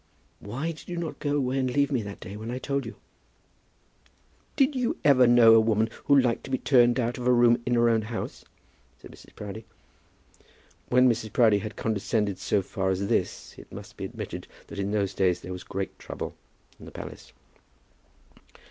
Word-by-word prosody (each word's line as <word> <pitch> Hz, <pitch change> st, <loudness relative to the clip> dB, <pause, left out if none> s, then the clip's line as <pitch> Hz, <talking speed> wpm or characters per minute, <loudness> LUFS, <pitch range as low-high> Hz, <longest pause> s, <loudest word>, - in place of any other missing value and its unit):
"Why 135 Hz, +11 st, -4 dB
did 155 Hz, 0 st, -12 dB
you 175 Hz, -, -4 dB
not 170 Hz, -2 st, -4 dB
go 145 Hz, -1 st, -1 dB
away 135 Hz, -1 st, 0 dB
and 130 Hz, -1 st, 0 dB
leave 140 Hz, +3 st, +1 dB
me 130 Hz, -4 st, +1 dB
that 100 Hz, -1 st, -8 dB
day 100 Hz, -, -8 dB
when 110 Hz, +2 st, -7 dB
I 125 Hz, -, -3 dB
told 140 Hz, -1 st, -2 dB
you?" 115 Hz, -, -8 dB, 1.6 s
"Did 280 Hz, 0 st, +3 dB
you 250 Hz, -3 st, -1 dB
ever 130 Hz, -4 st, +6 dB
know 120 Hz, -2 st, +7 dB
a 115 Hz, -, +8 dB
woman 110 Hz, 0 st, +1 dB
who 140 Hz, -1 st, +6 dB
liked 125 Hz, -3 st, +1 dB
to -, -, -9 dB
be 130 Hz, -, 0 dB
turned 120 Hz, -2 st, +4 dB
out 120 Hz, +1 st, -1 dB
of 125 Hz, -, -3 dB
a -, -, +5 dB
room 120 Hz, -1 st, +4 dB
in 120 Hz, -, +2 dB
her 120 Hz, 0 st, +4 dB
own 115 Hz, -1 st, +3 dB
house?" 110 Hz, +1 st, -6 dB, 0.6 s
said -, -, -13 dB
Mrs. -, -, -17 dB
Proudie. 105 Hz, +1 st, -8 dB, 1.2 s
When 125 Hz, +1 st, +5 dB
Mrs. 115 Hz, -3 st, 0 dB
Proudie 110 Hz, -4 st, +4 dB
had 110 Hz, +1 st, -6 dB
condescended 105 Hz, -2 st, -1 dB
so 100 Hz, 0 st, 0 dB
far 95 Hz, 0 st, -2 dB
as 95 Hz, +2 st, -1 dB
this, 100 Hz, -6 st, -1 dB
it -, -, -15 dB
must -, -, -10 dB
be -, -, -5 dB
admitted -, -, -7 dB, 0.2 s
that 100 Hz, -, -9 dB
in 100 Hz, 0 st, -1 dB
those 100 Hz, -2 st, 0 dB
days 90 Hz, -3 st, +1 dB
there 90 Hz, -, -6 dB
was 90 Hz, -, -7 dB
great 95 Hz, 0 st, -5 dB
trouble -, -, -6 dB, 0.5 s
in -, -, -12 dB
the -, -, -11 dB
palace. -, -, -9 dB
120 Hz, 195 wpm, -27 LUFS, 105-130 Hz, 1.6 s, a